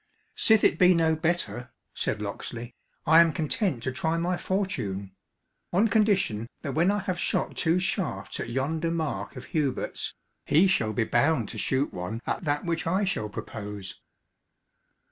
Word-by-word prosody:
"Sith 220 -1 +4
it - - +3
be 180 -1 +7
no 160 -1 +3
better," 160 -6 -1 0.2
said 105 - -2
Locksley, 115 +3 -6 0.3
"I 160 +1 +7
am 165 -1 +4
content 155 - -1
to 130 - -1
try 160 +5 -1
my 175 +2 0
fortune; 175 - -2 0.6
on 205 +6 +3
condition 195 - +2 0.2
that 140 -3 -3
when 170 +6 +3
I 205 - +2
have 185 -2 -3
shot - - -1
two 165 +1 +2
shafts 170 - -2
at - - -4
yonder 155 +7 -1
mark 155 -11 -3
of 125 - -8
Hubert's, 145 -5 -1 0.3
he 160 +6 +4
shall 115 - +2
be 110 - +1
bound 120 0 +2
to 110 - -6
shoot 135 +5 0
one 90 +6 -4
at - - -2
that 145 +1 0
which 165 -1 -1
I 185 +5 +2
shall 185 - -1
propose." 105 -2 -7
155 Hz, 165 wpm, -27 LUFS, 115-175 Hz, 0.6 s, be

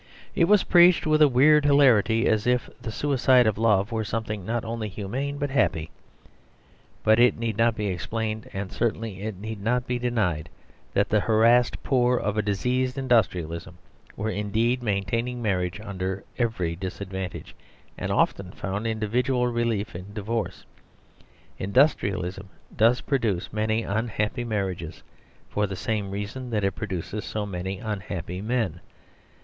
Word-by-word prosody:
It 170 - +3
was 205 +2 +5
preached 175 0 +6
with 155 0 +3
a 150 - +8
weird 145 +4 +5
hilarity, 125 -6 +4
as 110 +1 +1
if 125 0 +1
the 120 -3 -5
suicide 130 0 +3
of 110 -1 +1
love 105 -1 +3
were 110 -1 -1
something 105 -2 -3
not 115 +4 -2
only 115 -1 -3
humane 125 +9 -4
but 145 -1 -2
happy. 80 - +1 1.1
But 110 +1 +4
it 120 0 +5
need 115 -2 -2
not 115 +1 +2
be 105 -1 -3
explained, 110 +4 -3
and 95 -1 -5
certainly 110 -4 -2
it 105 -2 -4
need 110 0 -6
not 120 +4 0
be 125 -1 -2
denied, 105 -11 -1 0.5
that 100 +1 +2
the 105 - +3
harassed 115 +3 +3
poor 125 -2 +2
of 105 -2 -1
a 110 - +2
diseased 125 +6 -1
industrialism 90 -9 0 0.4
were 110 +1 -2
indeed 110 +5 0
maintaining 115 +3 -1
marriage 95 -4 -1
under 95 -2 -4 0.2
every 100 -9 0
disadvantage, 95 0 -6 0.4
and - - -4
often 95 -2 +1
found 100 +4 -3
individual 125 +3 0
relief 115 -2 -1
in 95 +4 -9
divorce. 110 +2 -3 0.9
Industrialism 100 - +1 0.3
does 115 +3 +4
produce 110 -11 -1
many 110 +1 0
unhappy 110 +3 -1
marriages, 95 -7 -3 0.4
for 105 0 -1
the 95 - -5
same 105 0 -2
reason 105 +6 -5
that 105 -3 -1
it 95 - +2
produces 100 +1 -5
so 105 -1 -3
many 95 0 -4
unhappy 95 -3 -5
men. 110 -6 -1
110 Hz, 145 wpm, -25 LUFS, 100-120 Hz, 1.1 s, a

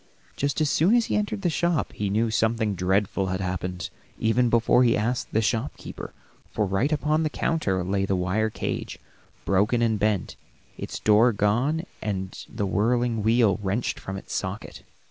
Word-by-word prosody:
Just 140 +2 -1
as 155 - +3
soon 185 +9 +4
as 235 -2 +3
he - - -1
entered 210 0 -1
the 175 - +2
shop 170 0 0
he 100 -1 -2
knew 110 +3 +1
something 110 -1 +1
dreadful 95 +1 0
had 95 0 -2
happened, 90 -1 -3 0.3
even 120 +2 +2
before 120 +2 +4
he 120 -2 +3
asked 120 +4 -1
the 110 - +1
shopkeeper, 115 +5 -3 0.4
for 105 - -1
right 100 +10 0
upon 155 +1 +1
the 155 - 0
counter 105 - 0
lay 95 +2 0
the 95 - +1
wire 95 +5 0
cage, - - -4 0.5
broken 105 +5 +2
and 110 -2 +1
bent, 105 -2 0 0.4
its - - -6
door 110 +3 +4
gone, 120 - +1 0.2
and 95 -3 -4
the 105 -2 -3
whirling 115 +3 +1
wheel 110 -2 +3
wrenched 100 +4 -1
from 95 0 -6
its - - -8
socket. 100 +2 -4
110 Hz, 170 wpm, -25 LUFS, 100-125 Hz, 0.5 s, soon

